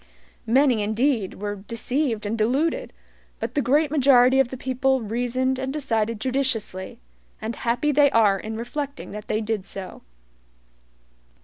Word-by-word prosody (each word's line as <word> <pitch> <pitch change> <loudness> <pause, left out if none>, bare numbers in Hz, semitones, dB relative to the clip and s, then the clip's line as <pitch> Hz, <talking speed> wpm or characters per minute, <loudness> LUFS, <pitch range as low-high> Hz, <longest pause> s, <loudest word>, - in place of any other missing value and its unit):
Many, 250 -1 +3
indeed, 220 0 0
were 205 +1 -4
deceived 230 +3 -2
and 210 +2 -1
deluded, 260 +9 0 0.5
but - - -4
the 290 - +1
great 285 +4 +2
majority 265 -3 +5
of 270 - +4
the 260 - -7
people 265 +1 +1
reasoned 245 +3 -1
and 265 0 -2
decided 230 -6 -1
judiciously; 230 -7 -1 0.4
and 225 +1 -4
happy 245 +6 0
they 290 0 +5
are 210 -5 +3
in 220 +2 -6
reflecting 280 +5 -5
that 210 +1 -8
they 215 - 0
did 215 -2 -2
so. 190 -1 -8
245 Hz, 140 wpm, -24 LUFS, 220-270 Hz, 0.5 s, majority